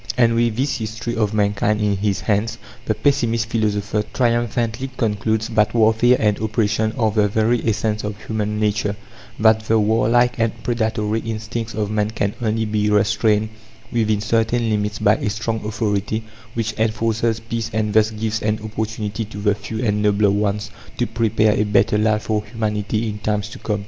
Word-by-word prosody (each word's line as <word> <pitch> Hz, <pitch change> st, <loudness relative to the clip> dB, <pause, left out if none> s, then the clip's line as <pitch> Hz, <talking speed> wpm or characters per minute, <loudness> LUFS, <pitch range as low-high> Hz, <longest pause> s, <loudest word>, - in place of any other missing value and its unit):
And, 115 Hz, -2 st, +4 dB
with 115 Hz, -1 st, +1 dB
this 135 Hz, +4 st, 0 dB
history 115 Hz, +2 st, -4 dB
of 105 Hz, -2 st, +1 dB
mankind 105 Hz, 0 st, +1 dB
in 105 Hz, -1 st, +1 dB
his 100 Hz, 0 st, -1 dB
hands, 110 Hz, +1 st, 0 dB, 0.3 s
the 110 Hz, -, 0 dB
pessimist 115 Hz, -5 st, +1 dB
philosopher 105 Hz, -1 st, 0 dB
triumphantly 120 Hz, 0 st, 0 dB
concludes 110 Hz, 0 st, 0 dB
that 110 Hz, -1 st, +2 dB
warfare 115 Hz, +2 st, +4 dB
and 105 Hz, -2 st, +1 dB
oppression 110 Hz, 0 st, 0 dB
are 110 Hz, -3 st, +2 dB
the 105 Hz, -1 st, +2 dB
very 110 Hz, +3 st, +1 dB
essence 105 Hz, 0 st, -1 dB
of 105 Hz, 0 st, -5 dB
human 105 Hz, -1 st, -2 dB
nature; 105 Hz, -1 st, 0 dB, 0.4 s
that 110 Hz, 0 st, +5 dB
the 110 Hz, 0 st, +3 dB
warlike 115 Hz, +3 st, +2 dB
and 115 Hz, -1 st, -1 dB
predatory 110 Hz, -2 st, 0 dB
instincts 115 Hz, 0 st, -4 dB
of 105 Hz, -1 st, -2 dB
man 105 Hz, 0 st, 0 dB
can 105 Hz, -2 st, -1 dB
only 110 Hz, 0 st, 0 dB
be 105 Hz, -1 st, 0 dB
restrained 105 Hz, +1 st, +2 dB, 0.4 s
within 110 Hz, -3 st, +1 dB
certain 115 Hz, +1 st, +1 dB
limits 105 Hz, 0 st, -1 dB
by 105 Hz, +1 st, +3 dB
a -, -, -2 dB
strong 110 Hz, +1 st, -3 dB
authority 105 Hz, 0 st, -1 dB, 0.3 s
which 110 Hz, -1 st, -1 dB
enforces 115 Hz, 0 st, 0 dB
peace 115 Hz, 0 st, -4 dB
and 105 Hz, 0 st, -1 dB
thus 110 Hz, 0 st, +4 dB
gives 110 Hz, 0 st, -3 dB
an 105 Hz, 0 st, 0 dB
opportunity 110 Hz, 0 st, -3 dB
to 105 Hz, 0 st, -10 dB
the 105 Hz, 0 st, +2 dB
few 110 Hz, +3 st, -5 dB
and 105 Hz, -1 st, +1 dB
nobler 105 Hz, -1 st, +3 dB
ones 105 Hz, +1 st, -1 dB, 0.3 s
to 120 Hz, -, +1 dB
prepare 110 Hz, -2 st, +2 dB
a 105 Hz, -, +1 dB
better 105 Hz, 0 st, +2 dB
life 105 Hz, 0 st, +1 dB
for 105 Hz, -1 st, -1 dB
humanity 110 Hz, 0 st, -2 dB
in 105 Hz, -1 st, -4 dB
times 105 Hz, -1 st, -1 dB
to -, -, -10 dB
come. 105 Hz, -2 st, -2 dB
110 Hz, 175 wpm, -20 LUFS, 105-115 Hz, 0.4 s, that